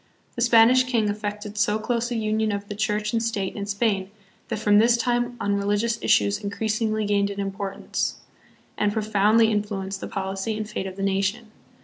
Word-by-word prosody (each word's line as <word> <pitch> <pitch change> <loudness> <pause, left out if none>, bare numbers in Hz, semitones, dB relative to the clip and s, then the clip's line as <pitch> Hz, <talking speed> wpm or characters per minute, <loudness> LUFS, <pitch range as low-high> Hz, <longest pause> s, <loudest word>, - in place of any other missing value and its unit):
The 235 - -4
Spanish 240 +2 +6
king 230 -5 +1
effected 210 0 -4
so 210 +1 +2
close 235 +2 -1
a 240 - -3
union 215 -1 0
of 200 0 -4
the 205 - -5
church 210 0 -1
and 230 - +1
state 210 -4 -2
in 200 -1 -4
Spain, 200 -2 0 0.4
that - - -3
from 205 -1 +4
this 235 +2 +4
time 240 +1 0
on 205 - 0
religious 205 +3 0
issues 100 0 +3
increasingly 215 +1 -1
gained 200 -1 +1
in 200 0 -6
importance, 195 0 -3 0.6
and 210 -1 +2
profoundly 215 +1 +3
influenced 200 -2 -3
the - - -4
policy 195 +3 -3
and 215 -1 -4
fate 190 -2 -4
of 185 - -7
the 195 - -4
nation. 200 +4 -1
210 Hz, 185 wpm, -24 LUFS, 200-225 Hz, 0.6 s, Spanish